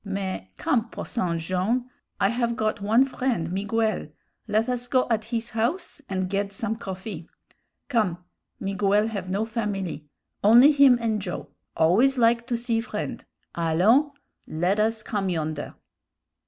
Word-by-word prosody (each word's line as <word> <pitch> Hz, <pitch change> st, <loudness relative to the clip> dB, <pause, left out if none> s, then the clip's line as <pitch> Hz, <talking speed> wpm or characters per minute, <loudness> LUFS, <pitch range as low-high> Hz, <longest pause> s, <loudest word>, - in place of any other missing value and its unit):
Mais, 195 Hz, -, -4 dB
come, 230 Hz, -1 st, 0 dB
Posson 180 Hz, -9 st, -2 dB
Jone'; 185 Hz, +9 st, -1 dB, 0.3 s
I -, -, +3 dB
have 235 Hz, 0 st, 0 dB
got 215 Hz, -2 st, -1 dB
one 225 Hz, +6 st, +4 dB
friend, 250 Hz, -10 st, -2 dB
Miguel; 215 Hz, +2 st, -1 dB, 0.4 s
led 215 Hz, +2 st, +1 dB
us 245 Hz, -1 st, -2 dB
go 255 Hz, +1 st, +2 dB
at 220 Hz, -1 st, +1 dB
his 230 Hz, 0 st, -3 dB
house 295 Hz, +10 st, -2 dB
and 185 Hz, -1 st, -1 dB
ged 200 Hz, +1 st, -1 dB
some 220 Hz, +2 st, -3 dB
coffee. 190 Hz, -4 st, -7 dB, 0.6 s
Come; 215 Hz, -10 st, +1 dB, 0.4 s
Miguel 200 Hz, +2 st, +1 dB
have 195 Hz, -4 st, -5 dB
no 200 Hz, +4 st, 0 dB
familie; 205 Hz, -8 st, -3 dB, 0.4 s
only 240 Hz, +8 st, +8 dB
him 280 Hz, -4 st, +6 dB
and 220 Hz, -3 st, -1 dB
Joe 175 Hz, -6 st, -5 dB, 0.3 s
always 225 Hz, +12 st, +4 dB
like 235 Hz, 0 st, +3 dB
to 240 Hz, -2 st, 0 dB
see 230 Hz, -1 st, 0 dB
friend; 235 Hz, -, -5 dB, 0.3 s
allons, 185 Hz, -, +3 dB, 0.4 s
led 180 Hz, +6 st, 0 dB
us 220 Hz, 0 st, +1 dB
come 200 Hz, -3 st, -2 dB
yonder." 155 Hz, -3 st, -3 dB
215 Hz, 140 wpm, -25 LUFS, 190-235 Hz, 0.6 s, only